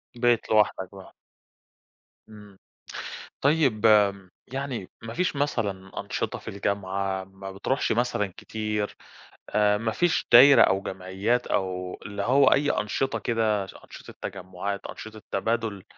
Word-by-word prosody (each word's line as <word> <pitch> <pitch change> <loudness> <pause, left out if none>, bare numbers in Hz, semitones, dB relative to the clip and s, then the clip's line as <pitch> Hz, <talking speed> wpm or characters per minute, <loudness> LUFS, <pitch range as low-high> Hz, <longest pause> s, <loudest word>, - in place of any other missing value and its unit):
بقيت 120 -1 +2
لوحدك 105 -3 +2
بقى. 95 -1 -12 1.2
إمم، 105 -2 -14 0.8
طيب 135 -7 +2
آمم 100 -3 +4 0.2
يعني 130 -6 -4
ما 115 0 -6
فيش 180 -3 0
مثلًا 100 -9 -2
أنشطة - - -3
في - - -18
الجامعة، 100 -1 -2
ما 95 0 -10
بتروحش 100 +8 -1
مثلًا 110 -5 0
كتير، 105 -1 -3 0.5
آآ 105 -1 +3
ما 110 +1 -1
فيش 175 +8 +1
دايرة 135 +4 +9
أو 95 0 +2
جمعيات 95 +6 -1
أو 90 -1 -2
اللي 100 -1 -4
هو 135 +5 +4
أي 145 +1 +2
أنشطة 105 +6 -1
كده 110 -4 0
ش - - -13
أنشطة - - -12
تجمعات، 95 +1 -5
أنشطة 110 0 -9
تبادل 110 -1 -1
105 Hz, 130 wpm, -26 LUFS, 95-120 Hz, 1.2 s, دايرة